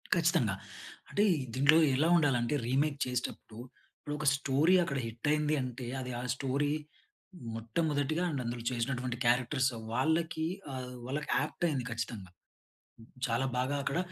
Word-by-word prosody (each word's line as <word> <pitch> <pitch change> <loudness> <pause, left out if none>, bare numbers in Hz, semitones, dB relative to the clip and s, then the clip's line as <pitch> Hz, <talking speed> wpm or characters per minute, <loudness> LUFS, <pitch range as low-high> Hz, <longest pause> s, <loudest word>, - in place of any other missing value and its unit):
ఖచ్చితంగా. - - +2 0.5
అంటే 205 - +2 0.3
దీంట్లో 140 +4 +5 0.2
ఎలా 155 +5 +3
ఉండాలంటే 135 -3 +2
రీమేక్ 140 +3 +1
చేసేటప్పుడు, 120 -3 -4 0.4
ఇప్పుడు 145 - -5
ఒక 155 - -3
స్టోరీ 140 +6 +3
అక్కడ 140 -4 -2
హిట్ 115 +5 -5
అయింది 150 0 +2
అంటే, 125 0 -5 0.2
అది 125 0 -5
ఆ - - -4
స్టోరీ 140 +2 0 0.8
మొట్టమొదటిగా 145 +7 0
అండ్ 140 -5 -2
అందులో 120 0 -4
చేసినటువంటి 125 0 -2
క్యారెక్టర్స్ 125 +3 +3 0.2
వాళ్ళకీ 160 +4 +1 0.3
ఆహ్, 125 -1 -6
వాళ్ళకి 145 +4 -3 0.2
ఏప్ట్ 175 - -3
అయింది 135 -6 -1
ఖచ్చితంగా. 110 -5 -5 1.0
చాలా 120 +3 0
బాగా 130 +3 0
అక్కడ 140 +4 -1
135 Hz, 130 wpm, -31 LUFS, 125-150 Hz, 1.0 s, దీంట్లో